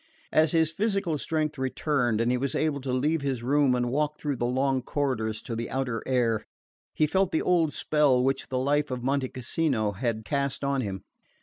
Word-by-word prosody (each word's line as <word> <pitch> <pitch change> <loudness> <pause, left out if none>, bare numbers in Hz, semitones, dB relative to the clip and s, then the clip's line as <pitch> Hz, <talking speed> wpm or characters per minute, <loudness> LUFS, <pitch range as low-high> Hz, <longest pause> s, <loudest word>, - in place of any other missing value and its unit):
As 155 -1 +4
his 160 -2 +2
physical 195 -4 0
strength 155 -2 -1
returned, 130 -3 0
and 120 +1 +2
he 125 - +2
was 140 +1 -2
able 150 -3 0
to 130 -1 -3
leave 150 +5 +1
his 135 -4 -2
room 140 0 +3
and 120 -1 0
walk 150 +2 0
through 145 -3 -2
the 120 - 0
long 130 +1 +1
corridors 120 -6 -2
to 115 - -5
the 115 +1 -4
outer 125 -4 -2
air, 120 -4 +1 0.5
he 155 - +3
felt 190 +4 +1
the 160 - +1
old 170 -4 +3
spell 145 -6 +2
which 135 +1 0
the 130 - -2
life 145 +3 +1
of 125 -2 -4
Monte 135 0 0
Cassino 130 -4 -1
had 110 +2 -3
cast 140 0 -1
on 140 -1 +1
him. 95 -4 -4
135 Hz, 200 wpm, -27 LUFS, 125-150 Hz, 0.5 s, As